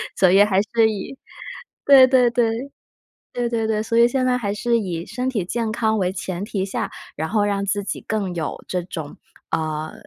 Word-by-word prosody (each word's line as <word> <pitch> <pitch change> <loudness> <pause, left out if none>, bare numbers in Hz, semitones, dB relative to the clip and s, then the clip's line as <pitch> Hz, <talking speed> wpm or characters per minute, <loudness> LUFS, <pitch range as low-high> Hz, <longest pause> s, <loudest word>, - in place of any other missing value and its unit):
所 185 -2 +4
以 195 +2 +6
还 195 -2 +2
是 220 +2 +2
以， 215 +6 -6 0.7
对 270 -2 +8
对 250 -2 +4
对。 235 +3 -1 0.6
对 245 -1 -1
对 225 -2 -1
对。 215 -1 0
所 230 +1 -2
以 235 0 +7
现 255 +1 0
在 250 - +2
还 205 -5 -2
是 235 +2 +1
以 175 -5 -4
身 250 +6 -4
体 215 -7 -1
健 220 +4 -2
康 220 -1 0
为 185 -2 0
前 190 0 -4
提 195 -2 -3
下， - - -3 0.3
然 160 +1 -2
后 210 -2 +2
让 200 -1 -1
自 200 +1 -1
己 - - -4
更 200 -4 -2
有 165 -2 -4
这 180 -1 -2
种， 160 -4 -7 0.4
呃， 155 -1 -2
210 Hz, 215 characters per minute, -21 LUFS, 190-235 Hz, 0.7 s, 对